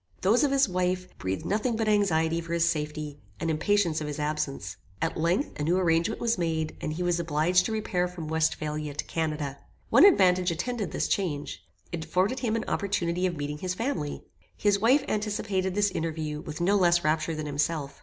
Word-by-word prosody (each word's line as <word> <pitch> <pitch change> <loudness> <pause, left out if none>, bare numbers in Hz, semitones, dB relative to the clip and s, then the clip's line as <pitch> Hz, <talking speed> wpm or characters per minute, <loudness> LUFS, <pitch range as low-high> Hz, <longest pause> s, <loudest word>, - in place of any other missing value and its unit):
Those 220 +9 +4
of 290 - +3
his 275 -2 +3
wife, 185 0 -1
breathed 95 +1 -3
nothing 220 +4 0
but 220 0 -1
anxiety 170 -6 +2
for 165 0 -5
his 170 0 +3
safety, 150 -2 -3 0.2
and 165 - 0
impatience 170 0 +1
of 150 - -3
his 150 - -4
absence. 150 -11 -3 0.2
At - - -1
length, 170 - +1
a - - -1
new 170 +4 +2
arrangement 170 +3 +1
was 230 -4 0
made, 160 -2 -1
and 155 - -2
he 175 +3 -3
was 175 -1 +1
obliged 170 +3 +2
to - - -4
repair 200 -5 0
from 175 -3 -7
Westphalia 155 -2 -1
to - - -3
Canada. 150 -4 -3 0.3
One - - +7
advantage 185 - +5
attended 205 +5 -2
this - - -1
change. 155 -7 -2 0.3
It 160 -2 -4
afforded 185 +10 +1
him 230 -3 0
an 225 - -2
opportunity 185 -3 0
of 175 -3 -4
meeting 145 +1 -4
his 185 +1 -2
family. 185 - -3 0.3
His 205 -1 +2
wife 260 +7 +4
anticipated 205 -3 -1
this 205 -1 +2
interview, 155 -3 -3
with 155 -1 -7
no 195 +4 +3
less 175 -2 +4
rapture 155 +1 +1
than 155 0 -4
himself. 145 -1 -2
170 Hz, 195 wpm, -27 LUFS, 155-200 Hz, 0.3 s, One